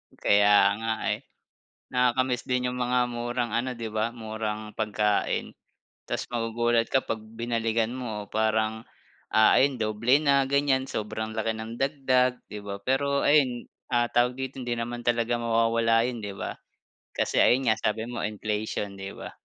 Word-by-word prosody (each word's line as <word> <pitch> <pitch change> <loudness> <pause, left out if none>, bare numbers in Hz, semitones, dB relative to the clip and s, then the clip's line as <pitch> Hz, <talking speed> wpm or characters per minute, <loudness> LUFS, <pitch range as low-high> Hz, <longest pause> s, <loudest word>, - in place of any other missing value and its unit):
Kaya 100 0 +5
nga 115 0 -1 0.2
eh. - - -2 0.8
Nakaka-miss 125 0 +2
din 125 0 0
yung 125 - -3
mga 125 0 +2
murang 120 -1 -3
ano, 130 +2 0
'di 115 -1 -4
ba 110 +1 0
murang 110 -2 -5
pagkain. 105 -1 0 0.5
Tas - - -2
magugulat 115 0 +1
ka 135 - +1
'pag 110 - -3
binalikan 115 0 -1
mo 110 -5 -5
parang, 110 0 0 0.5
ah, 110 0 +6
ayon 135 0 +3
doble 115 +6 +2
na 140 -2 +3
ganyan 135 -1 +2
sobrang 110 +1 -4
laki 110 0 0
ng 110 +1 -6
dagdag, 130 -2 +1
di 105 -1 -8
ba. 100 0 -6
Pero 140 +5 +1
ayun, 135 -5 +3 0.2
ah, 120 -1 +3
tawag 125 +2 +1
dito 130 0 -5
hindi 120 - -4
naman 120 +1 -4
talaga 120 0 +1
mawawala 115 0 +2
yun, 120 -4 -5
'di 100 - -4
ba. - - -4 0.6
Kasi - - 0
ayun 125 -1 +4
nga 110 - +2
sabi 110 +1 -1
mo 120 - -4
inflation, 105 -1 -3
'di 95 0 -6
ba. - - -8
115 Hz, 155 wpm, -27 LUFS, 110-125 Hz, 0.8 s, ah